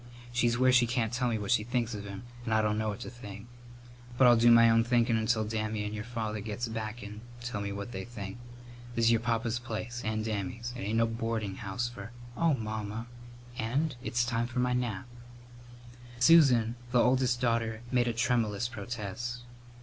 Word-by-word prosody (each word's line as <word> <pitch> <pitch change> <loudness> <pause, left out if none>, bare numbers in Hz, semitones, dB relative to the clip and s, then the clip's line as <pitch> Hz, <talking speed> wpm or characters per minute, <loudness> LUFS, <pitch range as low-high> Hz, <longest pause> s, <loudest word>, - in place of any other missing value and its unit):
She's 120 -1 +2
where 130 0 +5
she 125 -1 +5
can't 120 -2 0
tell 125 0 +1
me 115 - 0
what 105 0 -3
she 115 -3 +4
thinks 120 0 -1
of 105 -1 -6
him 100 +1 -7 0.2
and 110 -2 0
I 110 - +3
dunno 105 0 0
what 105 - -5
to - - -5
think. 105 -3 -9 0.7
But 130 - +6
I'll 120 -1 +8
do 120 +1 +5
my 115 0 +8
own 115 0 +5
thinkin' 120 -1 +2
until 110 0 +1
Dammy 110 -1 -2
and 105 0 -4
your 105 0 -5
papa 110 -3 -3
gets 115 +3 -3
back 110 0 -5
and 105 +1 -8 0.2
tell 120 -3 -4
me 100 0 -3
what 100 +3 -5
they 95 -3 -5
think. 100 -2 -7 0.6
This 115 0 +2
is 115 - +6
your 115 - +4
papa's 115 0 -1
place 120 +1 -5
and 110 0 -1
Dammy's. 110 +3 -3
It - - -7
ain't 105 +3 0
a - - +5
boardin' 115 -3 -2
house 110 +2 -2
for 115 -3 -8 0.2
" 120 0 -16
"Oh, 165 +1 +3
Mamma!" 110 -1 -4 0.5
"And 135 +6 0
it's 120 -2 +1
time 120 -1 0
for 125 +1 -8
my 125 0 +2
nap." 125 -3 -2 1.1
Susan, 125 -5 +5
the 125 - +4
oldest 125 -1 +3
daughter, 115 -2 0
made 125 -1 +3
a 120 - 0
tremulous 115 -1 +1
protest. 120 +1 -5
115 Hz, 200 wpm, -30 LUFS, 110-120 Hz, 1.1 s, I'll